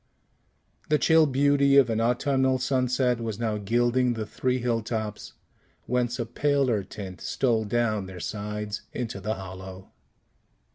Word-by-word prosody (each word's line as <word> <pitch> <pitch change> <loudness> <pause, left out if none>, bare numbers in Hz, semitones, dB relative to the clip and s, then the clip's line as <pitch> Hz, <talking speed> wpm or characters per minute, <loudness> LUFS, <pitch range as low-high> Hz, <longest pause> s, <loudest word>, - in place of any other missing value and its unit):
The 150 - +4
chill 160 +1 +5
beauty 140 0 +3
of 135 -3 +7
an 110 0 0
autumnal 130 +2 +2
sunset 125 -1 +1
was 110 -3 -3
now 110 -2 -1
gilding 120 +4 +2
the 110 -2 -4
three 125 +4 -1
hill 120 -2 0
tops, 110 -1 -5 0.5
whence 125 0 0
a 120 - -2
paler 130 -3 +1
tint 95 -1 -9
stole 115 -4 0
down 110 -3 0
their 95 -1 -9
sides 105 +1 -4
into 110 -5 -4
the 110 +3 -2
hollow. 95 0 -9
120 Hz, 140 wpm, -26 LUFS, 105-130 Hz, 0.5 s, of